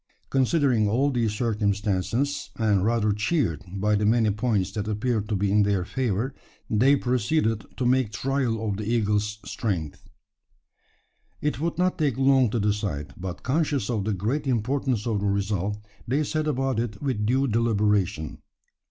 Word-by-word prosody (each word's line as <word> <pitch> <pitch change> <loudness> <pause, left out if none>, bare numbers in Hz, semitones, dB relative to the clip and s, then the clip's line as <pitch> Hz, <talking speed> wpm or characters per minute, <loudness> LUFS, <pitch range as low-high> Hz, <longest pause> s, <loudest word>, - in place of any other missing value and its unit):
Considering 130 -5 +2
all 135 +6 +2
these 115 -4 0
circumstances, 105 +5 -1
and 105 -4 +2
rather 110 -1 +2
cheered 105 - 0
by 100 +2 0
the 105 0 +1
many 110 0 +3
points 105 -3 0
that 105 +1 -4
appeared 110 0 -1
to 105 - 0
be 100 0 0
in 105 +1 +4
their 100 -3 +1
favour, 125 +2 -1 0.3
they 130 +6 +4
proceeded 120 -3 0
to 125 - -1
make 125 -3 +2
trial 120 -3 -1
of 100 -2 -1
the 105 - -4
eagle's 105 -2 0
strength. 100 - -3 1.4
It 150 -2 -1
would 165 +2 -2
not 180 0 +1
take 145 -6 +1
long 135 -2 +4
to 115 - -1
decide; 100 -9 -2
but 90 -1 -6
conscious 145 -1 0
of 105 -4 -1
the 110 - 0
great 120 +10 -2
importance 125 -1 0
of 110 -4 0
the 100 - -1
result, 100 0 -1 0.3
they 140 +6 +1
set 155 +1 -1
about 135 -4 0
it 115 -3 -3
with 130 -7 -1
due 130 +4 +2
deliberation. 105 - +1
110 Hz, 160 wpm, -25 LUFS, 105-130 Hz, 1.4 s, in